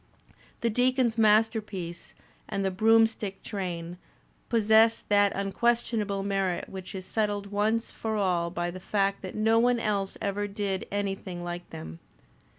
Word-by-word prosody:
The 235 - +1
Deacon's 250 0 +2
Masterpiece" 215 -5 +1 0.3
and 195 0 -1
"The 190 - +1
Broomstick 220 0 +2
Train" 175 -4 -4 0.5
possess 225 0 +4
that 205 -1 +3
unquestionable 210 0 0
merit 195 -3 -1
which 190 0 -8
is 185 -1 -6
settled 205 -1 -1
once 215 +3 0
for 220 -1 -3
all 180 -4 +1
by 175 0 -3
the 185 - -8
fact 195 +1 0
that 185 - -7
no 225 +1 +3
one 245 0 +3
else 200 -3 -1
ever 205 0 -2
did 200 -2 -3
anything 195 -3 -3
like 175 0 -6
them. 80 +1 -8
205 Hz, 140 wpm, -28 LUFS, 190-220 Hz, 0.5 s, possess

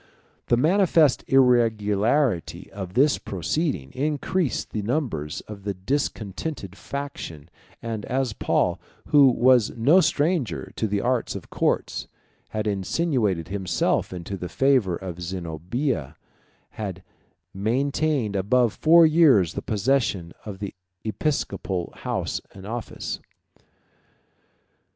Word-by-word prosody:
The 120 - +3
manifest 160 -1 +4
irregularity 115 - +2
of 95 -2 -7
this 140 +3 +4
proceeding 95 - -2
increased 150 +2 -1
the 105 - -2
numbers 105 - -2
of 105 -2 -10
the 100 0 -3
discontented 105 - -3
faction; 90 - -7 0.3
and 115 -3 -4
as 130 -3 -1
Paul, - - +1 0.3
who 145 -2 +7
was 125 -2 +4
no 145 +11 +5
stranger 155 - 0
to 110 - -1
the 100 -1 -1
arts 125 +1 0
of - - -8
courts, - - -1 0.4
had 110 0 -3
insinuated 105 - 0
himself 95 -3 0
into 90 +2 -5
the 90 -1 -6
favor 130 -10 +2
of 90 -1 -7
Zenobia, 85 - -3 0.6
he 105 -3 -3 0.6
maintained 130 +2 0
above 115 +4 +2
four 165 +1 +6
years 150 - +5
the - - -4
possession 105 -6 0
of 100 -2 -6
the 100 0 -5 0.3
episcopal 110 - -2
house - - -3
and 95 0 -10
office. 115 +2 -5
110 Hz, 110 wpm, -24 LUFS, 95-140 Hz, 0.6 s, who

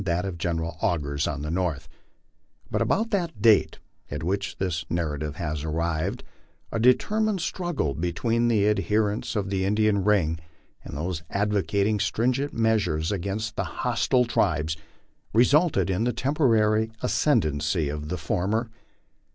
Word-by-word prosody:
83 90 -4 0
that 90 +2 -1
of 95 -3 -4
General 85 -2 -2
Augur's 70 -3 0
on 75 -1 -3
the 75 - -3
north; 85 -4 -1 0.8
but - - 0
about 225 +3 +1
the 185 -5 +1
date 105 -1 +4 0.3
at 75 +3 -5
which 100 +3 -2
this 90 -4 -1
narra 80 -4 -1
tive 75 -1 -4
has 75 -2 -3
arrived, 80 0 -2 0.5
a 115 - -1
determined 210 - +3
struggle 165 - -2
between 115 - 0
the 105 -3 +3
adherents 105 0 0
of 100 -2 -1
the 95 -1 0
Indian 105 0 +2
ring 90 -6 +2 0.4
and - - -7
those 85 +1 -3
advocating 105 +1 +1
stringent 130 +7 0
measures 105 -8 +1
against 100 +3 -3
the - - -1 0.2
hostile 125 -1 +2
tribes, 80 -8 +1 0.6
resulted 145 - +4
in 95 +4 0
the 120 0 +1
temporary 115 -5 +2
ascendancy 80 - +1
of 75 +1 -5
the 90 - -2
former. 105 +8 -1
100 Hz, 145 wpm, -26 LUFS, 80-115 Hz, 0.8 s, date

